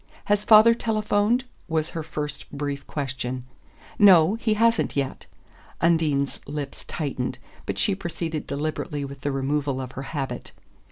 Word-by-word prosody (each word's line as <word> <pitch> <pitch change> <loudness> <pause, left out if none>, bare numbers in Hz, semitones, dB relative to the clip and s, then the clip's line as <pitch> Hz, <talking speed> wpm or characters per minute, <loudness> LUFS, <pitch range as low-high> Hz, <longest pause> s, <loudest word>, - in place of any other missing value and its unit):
"Has 205 0 +2
father 220 +1 +8
telephoned?" 220 +1 +1 0.2
was 160 -1 -1
her 165 - -4
first 150 -2 -5
brief 140 -1 -4
question. 130 -3 -4 0.5
"No, 185 -3 +7
he 225 -1 0
hasn't 230 +1 +2
yet." 140 -2 -2 0.5
Undine's 155 -5 +2
lips 145 -1 -5
tightened, 130 -4 -3 0.3
but - - -2
she 205 - +2
proceeded 170 -4 -4
deliberately 145 0 -3
with 140 0 -9
the 145 - -1
removal 135 0 -1
of 130 -1 -5
her 135 - -6
habit. 140 -4 -4
150 Hz, 135 wpm, -25 LUFS, 140-205 Hz, 0.5 s, father